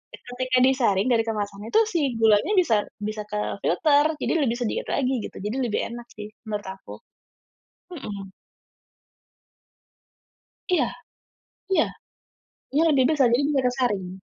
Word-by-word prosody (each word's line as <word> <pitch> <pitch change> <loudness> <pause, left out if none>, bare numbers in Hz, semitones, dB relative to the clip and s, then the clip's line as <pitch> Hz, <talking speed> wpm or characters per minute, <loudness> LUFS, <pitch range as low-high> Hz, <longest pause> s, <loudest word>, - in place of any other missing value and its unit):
ketika 255 +1 -2
disaring 255 -4 +3
dari 230 -1 +2
kemasannya 205 -1 -4
itu 445 - +7
si 345 - +1 0.2
gulanya 220 - +3
bisa 345 -12 +4 0.3
bisa 215 0 -4
kefilter, 285 - +1
jadi - - 0
lebih 235 - 0
sedikit 240 -2 -3
lagi 260 -2 0
gitu - - -14
jadi 215 +6 -2
lebih 235 -3 -1
enak 240 0 -8
sih 210 0 -8 0.2
menurut 210 -2 -3
aku. 190 - -9 1.0
Mhm. 200 - -7 2.4
Iya 360 - +3 0.8
iya, 380 - +4 0.9
iya 300 +3 +4
lebih 275 -4 +4
besar 290 -5 +4
jadi 245 +4 +3
bisa 280 -3 +2
kesaring. 205 -7 -2
235 Hz, 125 wpm, -24 LUFS, 210-265 Hz, 2.4 s, itu